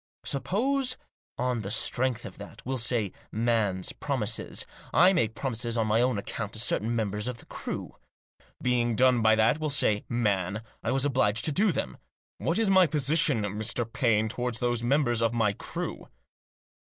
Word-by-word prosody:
Suppose 255 - 0 0.4
on 125 -2 -1
the 100 - -5
strength 125 +2 +1
of - - -10
that, - - -11
we'll 130 0 -2
say, 115 -4 +1 0.2
man's 110 -5 0
promises, 120 -6 -2 0.3
I 180 +3 +6
make 115 - 0
promises 120 -2 -2
on 115 - +1
my 110 +2 +2
own 125 -3 +1
account 105 +1 -5
to 110 - -6
certain 115 0 +1
members 105 -1 -1
of 125 -1 -4
the - - -13
crew. - - -6 0.6
Being 120 -2 +1
done 125 0 +4
by 110 0 +5
that, 110 +7 +3
we'll 155 -1 -1
say, 105 -7 +2
man, 105 -3 0 0.2
I - - -2
was 135 +1 +1
obliged 120 -6 +1
to 155 - +1
do 200 +7 +3
them. 65 - -4 0.4
What 165 - 0
is 225 -1 +2
my 190 -2 +5
position, 150 -4 +3
Mr. 110 +4 -1
Paine, 115 -4 +2
toward 120 +1 -2
those 120 0 0
members 120 -2 +2
of 115 0 +1
the 110 -3 +1
crew - - -6
120 Hz, 170 wpm, -28 LUFS, 110-135 Hz, 0.6 s, I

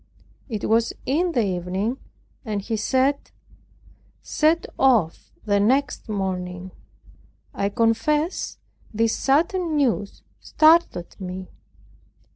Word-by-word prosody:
It 215 -4 -3
was 230 +1 +2
in 335 +6 +1
the 235 -6 +2
evening, 190 +6 -2 0.4
and 215 -4 -3
he 225 +2 -2
said, 260 +6 0 0.9
"set 320 +2 +1
off 230 -12 +2
the 205 -1 +2
next 250 +3 +1
morning." 185 -2 -3 0.8
I 200 - -1
confess 230 - 0 0.3
this 225 +1 +1
sudden 330 +4 +1
news 235 -8 -1 0.2
startled 310 - +2
me. 185 0 -6
225 Hz, 95 wpm, -23 LUFS, 200-285 Hz, 0.9 s, was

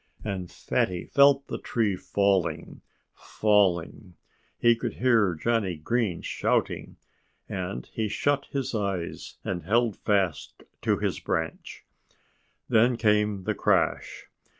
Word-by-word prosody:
And 95 -4 -4
Fatty 90 -1 -1
felt 140 0 +4
the - - -5
tree 110 -5 0
falling, 95 -5 0 0.3
falling. 95 -3 0 0.4
He 120 0 +4
could 115 - -4
hear 115 -8 +3
Johnnie 105 0 0
Green 105 +2 -1
shouting. - - -1 0.5
And 90 -10 -4
he 110 - -1
shut 140 +6 0
his 135 -3 -3
eyes 100 -5 -3
and 90 -2 -3
held 115 +4 +1
fast 95 -7 -1 0.2
to - - +1
his - - -2
branch. - - -4 0.8
Then 115 +2 +3
came 105 -3 +1
the - - -1
crash. - - 0
105 Hz, 115 wpm, -26 LUFS, 90-115 Hz, 0.8 s, felt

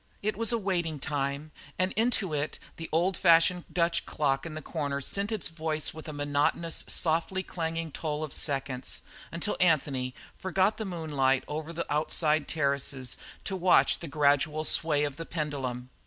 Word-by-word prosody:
It 215 0 0
was 230 +2 0
a 235 - +2
waiting 175 -7 -1
time, 140 +1 -2 0.3
and 185 +1 +1
into 220 -6 +1
it 150 +1 -1 0.2
the 165 - -6
old 175 +4 +2
fashioned 170 +1 +5
Dutch 170 +1 +1
clock 135 0 0
in 155 - -7
the 155 - -4
corner 145 -4 -2
sent 200 - 0
its 215 -5 0
voice 155 -2 -1
with 160 0 -9
a - - -4
monotonous, 145 +3 0
softly 170 +3 +2
clanging 165 -2 -3
toll 150 +1 -3
of 155 - -4
seconds, 135 -3 -2 0.3
until 170 +5 -2
Anthony 140 -7 +2 0.2
forgot 190 +2 +1
the 220 - -3
moonlight 145 -7 +1
over 155 +2 -4
the 170 0 -3
outside 155 0 +2
terraces 140 -3 -1 0.3
to 195 - -3
watch 185 0 +4
the 170 - -6
gradual 150 +1 +2
sway 150 -2 +2
of 145 -1 -2
the 165 - -5
pendulum. 130 -6 -3
155 Hz, 165 wpm, -29 LUFS, 145-170 Hz, 0.3 s, fashioned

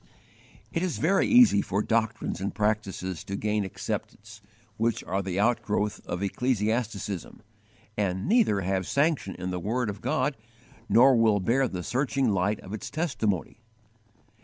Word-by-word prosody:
"* - - -27
It 165 - 0
is 180 -3 -1
very 190 +5 +2
easy 245 - +6
for 100 +2 -1
doctrines 115 -3 -1
and 100 - -3
practices 100 -4 -1
to 100 - -4
gain 105 +1 0
acceptance, 105 +2 -6 0.4
which 115 0 0
are 95 +2 -1
the 95 0 -3
outgrowth 105 -2 0
of 90 +3 -3
ecclesiasticism, 110 -3 -2 0.5
and 95 0 -1
neither 210 - +3
have 95 0 -1
sanction 140 - 0
in 90 +1 -4
the 90 - -2
word 110 +4 -1
of 100 - -11
God, 150 -2 0 0.5
nor 130 +3 +6
will 110 -3 +4
bear 125 +7 +2
the 90 -5 -5
searching 130 0 0
light 100 +2 0
of 95 - -9
its 110 - -5
testimony. 115 - -2
105 Hz, 150 wpm, -27 LUFS, 100-125 Hz, 0.5 s, easy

